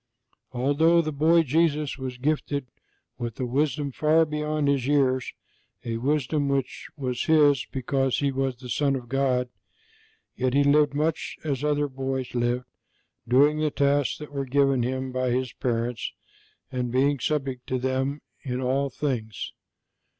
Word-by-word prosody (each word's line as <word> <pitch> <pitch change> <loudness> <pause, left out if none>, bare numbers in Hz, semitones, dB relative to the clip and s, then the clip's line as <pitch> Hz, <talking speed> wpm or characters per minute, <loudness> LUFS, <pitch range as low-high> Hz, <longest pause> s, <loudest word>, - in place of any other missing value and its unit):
Although 145 +7 +3
the 155 - -2
boy 160 +3 +4
Jesus 150 0 +1
was 130 -1 -5
gifted 145 0 -1 0.5
with 120 -2 -5
a 130 - 0
wisdom 140 +3 0
far 155 +4 +3
beyond 150 -1 -1
His 140 -3 +1
years 130 -3 +2 0.5
a 115 -1 -2
wisdom 145 +3 0
which 135 -1 -2
was 125 -3 -2
His 145 -4 +4
because 135 0 0
He 140 -1 +1
was 135 -1 -1
the 125 +1 -11
Son 140 +2 +1
of 125 -2 -6
God, 130 -1 +1 0.9
yet 130 0 0
He 145 - +5
lived 145 0 +4
much 155 +2 -1
as 140 -3 -2
other 145 -1 +1
boys 130 -1 -4
lived, 120 +1 0 0.6
doing 145 +5 +4
the 155 0 +2
tasks 140 -1 +1
that 150 -1 -9
were 140 -1 -2
given 135 -1 +2
Him 130 +2 -2
by 130 0 0
His 125 0 -1
parents 120 -1 -2 0.6
and 125 -2 -2
being 135 +2 +2
subject 135 -2 -2
to 130 - 0
them 130 +3 -1 0.2
in 125 -3 -3
all 135 +2 0
things. 120 -6 -3
135 Hz, 150 wpm, -26 LUFS, 125-145 Hz, 0.9 s, He